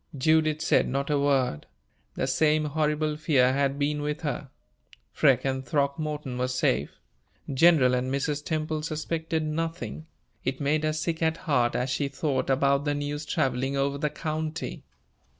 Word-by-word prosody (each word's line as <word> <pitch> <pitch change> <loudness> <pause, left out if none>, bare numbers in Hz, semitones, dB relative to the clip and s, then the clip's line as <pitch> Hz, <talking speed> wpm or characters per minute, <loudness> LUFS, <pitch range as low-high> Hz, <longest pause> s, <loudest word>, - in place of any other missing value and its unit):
Judith 155 +2 +2
said - - +3
not 140 +3 -1
a 145 - +2
word. 135 - +1 0.5
The - - -1
same 150 +3 +2
horrible 150 0 0
fear 135 -5 +3
had 140 0 +1
been 145 +1 0
with 150 +1 -3
her. 145 -3 -3 0.6
Freke 130 -2 +3
and 130 -1 -1
Throckmorton 140 0 -2
were 125 - +1
safe 130 0 0 0.6
General 135 -3 +5
and 125 +1 0
Mrs. 145 +2 -1
Temple 155 -1 -2
suspected 160 +1 -2
nothing 165 +1 -4 0.4
it 130 0 -2
made 150 +2 +1
her 155 0 +1
sick 160 +1 -2
at 160 0 +1
heart 125 -7 +2
as 125 +1 -1
she 140 +2 0
thought 140 0 -2
about 140 +1 +3
the 145 0 0
news 145 +1 -4
traveling 135 -2 0
over 140 +1 0
the 150 - 0
county. 155 +1 -4
145 Hz, 155 wpm, -27 LUFS, 135-155 Hz, 0.6 s, General